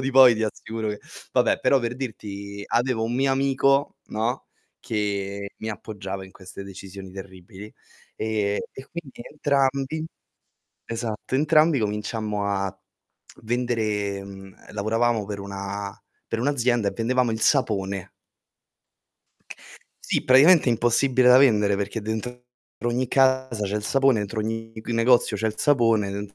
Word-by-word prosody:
di 135 +1 -1
poi 130 -2 +8
ti 110 - -2
assicuro 110 +1 -4
che 105 - -6 0.3
vabbè, - - +3
però 135 - +3
per 120 +1 -3
dirti 100 -5 -6
avevo 120 -2 +1
un 115 +2 -2
mio 135 +1 +2
amico, 135 +1 +2
no, 115 +4 -2 0.3
che 100 -2 -3
mi 110 - -5
appoggiava 100 -3 -6
in 95 - -15
queste 95 +1 -10
decisioni 95 0 -10
terribili, 95 +1 -11 0.4
e 105 -2 -1
e 130 - -10
quindi 165 -8 -8
entrambi 140 +1 0 0.8
esatto, 115 +1 -4
entrambi 155 0 +4
cominciammo 105 0 -2
a 100 -1 -2 0.6
vendere 110 -4 -1
mhmm, 95 -1 -11
ehm, - - -12
lavoravamo 110 +2 +1
per 100 -1 -5
una 100 0 -6 0.3
per 115 - -2
un'azienda 120 -5 +1
e - - -3
vendevamo 125 +1 +1
il 110 - -3
sapone. 100 -8 +1 2.0
Sì, - - +1
praticamente 145 +4 +6
impossibile 120 +2 +3
da 125 +1 +8
vendere, 105 -7 +4
perché 100 +2 -3
dentro 115 +3 -5 0.4
ogni 120 +1 0
casa 130 -5 +2
c'è 100 - -3
il 105 - -3
sapone, 135 +1 +3
entro 105 +2 -3
ogni 115 +1 -4
c - - -13
negozio 115 0 +3
c'è 105 +2 -1
il 110 - -2
sapone, 115 -8 +3
den 100 0 -6
110 Hz, 140 wpm, -24 LUFS, 100-130 Hz, 2.0 s, poi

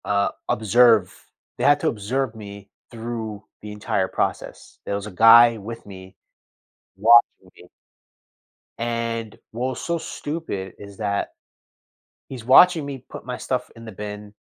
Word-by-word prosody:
Uh, 100 0 +1 0.2
observe. 110 -2 +3 0.3
They - - -4
had 145 0 +4
to 160 - 0
observe 115 +2 -2
me 100 -2 -11 0.2
through 110 -3 -6 0.2
the 105 - -8
entire 105 -2 -2
process. - - -4
There 100 - -2
was 100 0 -5
a - - -8
guy 115 +4 +7
with 115 +3 -9
me 95 -2 -12 0.8
watching 110 -3 +4
me. 90 - -16 1.1
And 115 -1 -3
what 125 +3 -3
was 130 - -6
so 170 0 -2
stupid 145 - -6
is 100 -1 -12
that. 100 -2 -2 1.0
He's 130 -4 -9
watching 160 +6 +6
me 135 -2 -8
put - - -10
my 125 0 -6
stuff 125 -1 -3
in 115 0 -12
the 110 - -8
bin, 105 +1 -8
115 Hz, 145 wpm, -22 LUFS, 100-125 Hz, 1.1 s, guy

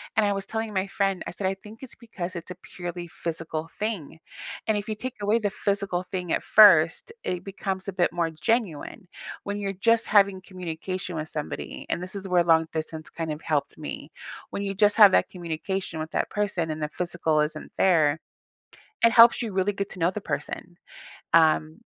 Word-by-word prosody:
and 220 - +4
I 205 - +2
was 195 -1 -4
telling 220 0 -3
my 190 -1 0
friend, 195 -1 -1
I - - -5
said, 190 +2 -2
"I 190 - 0
think 210 +3 -13
it's 265 -3 -9
because 185 -6 -7
it's 170 +1 -7
a - - -6 0.2
purely 175 -1 -5
physical 165 -1 -5
thing, 195 -8 -3 0.5
and 220 -1 +2
if 205 +2 -4
you 215 - -1
take 255 +4 -6
away 210 +3 +2
the 205 -2 0
physical 200 -3 -1
thing 180 -3 -3
at - - 0
first, 185 - +6
it 180 -1 -3
becomes 195 -1 -4
a 195 - -3
bit 175 -1 +1
more 170 -1 0
genuine 170 0 -2 0.4
when 205 0 -3
you're 200 -1 -2
just 230 +4 +2
having 200 -2 +4
communication 185 0 -5
with 155 0 -3
somebody," 150 -1 -6
and 175 - -1
this 185 - -6
is 195 -1 -5
where 180 -2 +3
long 165 -1 +4
distance 160 0 -5
kind 165 -2 -4
of 150 +1 -5
helped 150 -3 -1
me. - - -7 0.4
When 200 - -3
you 195 0 -3
just 205 +1 +4
have 205 -3 +9
that - - +3
communication 175 0 -4
with 155 +1 -5
that - - -1
person 190 -6 -1
and 155 0 -3
the 150 - -2
physical 170 -2 -1
isn't 155 0 -3
there, 160 -5 +4 0.8
it 230 - +7
helps 235 +1 +7
you 230 -3 -3
really 190 +2 +1
get 200 0 -3
to 185 - -9
know 165 - +3
the 210 - -5
person. 175 -2 -5 0.6
Um 155 +1 +4
185 Hz, 200 wpm, -26 LUFS, 165-205 Hz, 0.8 s, have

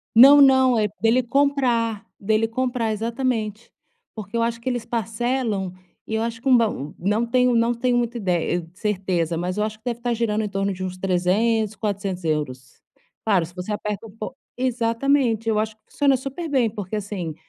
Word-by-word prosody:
Não, 275 +5 +9
não, 260 -3 +6
é 210 - +2
dele 230 +3 +3
comprar, 245 -5 +1
dele 220 +2 +1
comprar, 240 -2 -1
exatamente. 225 -1 -2 0.4
Porque 215 0 -6
eu 230 - +2
acho 230 0 -1
que 235 - -4
eles 245 -2 -2
parcelam 225 -3 -2 0.3
e 220 - -4
eu 220 - 0
acho 230 0 -3
que 270 - -2
um 255 - +7
b 230 - +4 0.3
não 210 +5 +1
tenho 250 +1 +3
não 230 +1 +2
tenho 245 +1 +1
muita 240 0 -1
idei 175 -4 -1
certeza, 185 -5 -1
mas 180 +4 -2
eu 210 - +2
acho 215 0 -4
que 220 - -42
deve 240 -2 -2
estar 240 0 0
girando 220 -2 0
em 210 - -2
torno 195 0 -1
de 185 - -7
uns 185 -1 -4
300, 200 +4 +1
400 200 -4 -3
euros. 130 -6 -3 0.4
Claro, 195 -6 +3
se 175 +2 -11
você 180 +3 -5
aperta 210 +1 -4
um - - -11
po 215 +4 -7 0.2
exatamente, 240 -1 +1
eu 215 -1 +2
acho 215 0 -2
que - - -48
funciona 280 -2 +3
super 275 +6 -5
bem, 260 -6 +2
porque 205 -1 -5
assim, 195 -6 -4
225 Hz, 190 wpm, -23 LUFS, 200-240 Hz, 0.4 s, Não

